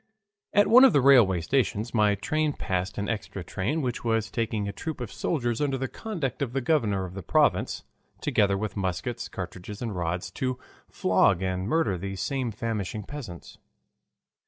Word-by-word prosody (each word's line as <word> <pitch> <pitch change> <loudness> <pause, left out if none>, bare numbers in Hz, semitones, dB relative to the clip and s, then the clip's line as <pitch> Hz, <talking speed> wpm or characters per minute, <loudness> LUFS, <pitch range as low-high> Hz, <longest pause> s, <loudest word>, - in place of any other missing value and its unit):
At 205 0 +5
one 250 +3 +8
of 265 - +7
the 145 - +5
railway 120 -10 +6
stations 115 +2 0
my 105 -3 +3
train 155 +8 0
passed 95 -3 -3
an 100 0 -2
extra 100 -4 -4
train 120 - -2
which 125 -2 -3
was 115 -2 0
taking 110 -3 -1
a - - -2
troop 160 +8 -5
of 120 - -5
soldiers 120 -7 -1
under 140 -2 +1
the 130 0 -2
conduct 165 - -4
of 125 -4 -2
the 135 - +1
governor 115 -9 +1
of 90 - -8
the 95 - -6
province, 85 - +1 0.4
together 100 -1 +2
with 105 +1 -4
muskets, 100 +5 -3
cartridges, 95 +3 -7
and 115 -5 -4
rods, 90 0 -2
to 130 -1 -2 0.3
flog 95 0 +2
and 95 0 -2
murder 115 - +1
these 95 +1 -5
same 135 -3 -1
famishing 110 -2 -3
peasants. 110 - -9
110 Hz, 175 wpm, -27 LUFS, 95-135 Hz, 0.4 s, one